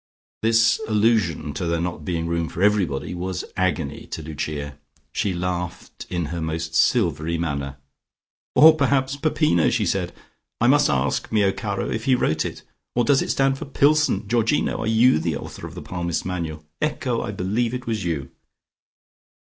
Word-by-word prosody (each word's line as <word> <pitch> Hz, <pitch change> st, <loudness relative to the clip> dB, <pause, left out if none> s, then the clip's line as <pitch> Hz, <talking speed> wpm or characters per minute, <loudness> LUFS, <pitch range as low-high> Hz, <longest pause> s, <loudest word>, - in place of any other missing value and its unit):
This 115 Hz, -, +3 dB
allusion 105 Hz, -9 st, +1 dB
to 85 Hz, +3 st, -3 dB
there 85 Hz, 0 st, 0 dB
not 85 Hz, -2 st, -3 dB
being 85 Hz, 0 st, -2 dB
room 85 Hz, -1 st, -1 dB
for 90 Hz, -, -3 dB
everybody 95 Hz, -9 st, +1 dB
was 90 Hz, 0 st, -4 dB
agony 90 Hz, -6 st, -1 dB
to 80 Hz, -, -6 dB
Lucia. 75 Hz, -1 st, -5 dB, 0.3 s
She 100 Hz, -, -1 dB
laughed 90 Hz, -1 st, -4 dB
in 85 Hz, -2 st, -1 dB
her 85 Hz, -, -3 dB
most 80 Hz, 0 st, -3 dB
silvery 85 Hz, -, +2 dB
manner. 70 Hz, -4 st, -3 dB, 0.8 s
"Or, 155 Hz, +1 st, +8 dB
perhaps 135 Hz, -2 st, +1 dB
Peppino," 145 Hz, -, +2 dB
she -, -, 0 dB
said. -, -, -1 dB, 0.5 s
"I 120 Hz, -, +2 dB
must 145 Hz, +4 st, +5 dB
ask 65 Hz, -1 st, 0 dB
mio 105 Hz, -3 st, +3 dB
caro -, -, -3 dB
if -, -, -3 dB
he 130 Hz, -, +4 dB
wrote 80 Hz, -10 st, 0 dB
it. -, -, -6 dB, 0.3 s
Or 120 Hz, -, +3 dB
does 140 Hz, +1 st, +3 dB
it -, -, -3 dB
stand 135 Hz, 0 st, +2 dB
for -, -, -5 dB
Pillson? 140 Hz, -7 st, +2 dB
Georgino, 115 Hz, +5 st, +1 dB
are -, -, -2 dB
you 115 Hz, -2 st, +4 dB
the 80 Hz, -2 st, -1 dB
author -, -, -8 dB
of -, -, -12 dB
the -, -, -7 dB
Palmist's 85 Hz, -2 st, -3 dB
Manual? 80 Hz, -4 st, -4 dB, 0.2 s
Ecco! 130 Hz, -5 st, -1 dB
I -, -, -4 dB
believe 105 Hz, +5 st, -1 dB
it 125 Hz, -, -6 dB
was 110 Hz, -3 st, -2 dB
you." 75 Hz, -6 st, -3 dB
90 Hz, 170 wpm, -23 LUFS, 80-120 Hz, 0.8 s, Or